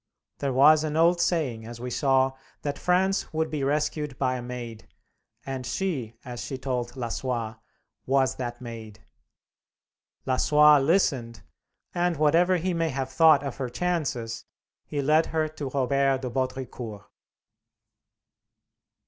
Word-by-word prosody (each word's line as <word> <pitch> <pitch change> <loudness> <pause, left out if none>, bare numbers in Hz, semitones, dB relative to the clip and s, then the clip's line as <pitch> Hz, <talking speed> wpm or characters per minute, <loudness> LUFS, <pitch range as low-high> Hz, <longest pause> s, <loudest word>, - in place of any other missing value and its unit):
There 140 -1 -1
was 150 +4 +6
an 155 0 -2
old 170 +1 +4
saying, 135 -11 -1
as 120 0 -9
we 125 +1 -5
saw, 135 0 +2 0.3
that 145 -1 -3
France 190 +2 +1
would 160 0 -1
be 150 -3 -2
rescued 150 0 -1
by 130 -1 0
a 125 - -4
Maid, 120 -2 -7 0.6
and 135 -1 -4
she, 125 - -3
as 120 -2 -6
she 135 - -5
told 125 -2 -3
Lassois, 120 -2 -3 0.5
was 135 0 +2
that 120 -1 -5
Maid. 110 -3 -9 1.2
Lassois 150 +3 +5
listened, 135 -7 +1 0.5
and, 175 -2 0
whatever 170 +5 +3
he 180 +2 -1
may 165 -1 0
have 135 -2 -3
thought 155 +1 +5
of 140 -3 -5
her 130 -2 -3
chances, 125 -7 -2 0.4
he 145 -1 -2
led 155 +3 +3
her 160 -1 0
to 150 -3 -6
Robert 135 0 +1
de 125 - -3
Baudricourt. 130 -4 -4
135 Hz, 135 wpm, -26 LUFS, 125-155 Hz, 1.2 s, was